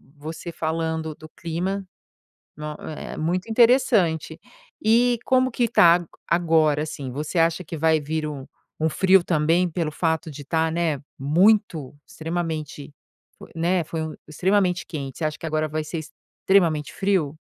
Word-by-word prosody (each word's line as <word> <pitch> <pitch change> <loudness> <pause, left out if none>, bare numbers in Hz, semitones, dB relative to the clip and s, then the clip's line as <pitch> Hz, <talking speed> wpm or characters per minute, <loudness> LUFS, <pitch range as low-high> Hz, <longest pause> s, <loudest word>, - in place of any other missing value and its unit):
você 160 +3 -7
falando 160 -1 -2
do 155 - -12
clima, 180 +5 -3 0.7
no 150 0 -5
é 155 - -7
é - - -9
muito 180 +6 -2
interessante, 225 - +3 0.4
e 235 +2 +4
como 260 0 +3
que 240 0 +1
tá 170 -6 +6 0.3
a - - +5
agora 160 -3 +2
assim? 140 -4 -5
Você 150 +6 -3
acha 165 +2 +1
que 165 +1 -6
vai 160 +1 +3
vir 155 +1 -3
um, 140 -3 -7 0.3
um 160 - +1
frio 190 +3 +4
também 165 +2 +2
pelo 165 -2 -2
fato 160 0 -1
de 145 0 -9
tá, 160 +2 0
né, 165 -4 0 0.2
muito, 165 0 +2
extremamente, 160 -3 -5 0.4
fo - - -13
né, 170 +2 +1
foi 160 +1 -4
um 160 -1 -5
extremamente 180 +2 +1
quente, 140 -5 -6
você 165 - -2
acha 155 0 -2
que 165 - -6
agora 155 0 0
vai 155 +1 -2
ser 160 +2 -5 0.5
extremamente 165 -6 +3
frio? 185 -7 0
160 Hz, 160 wpm, -24 LUFS, 155-180 Hz, 0.7 s, tá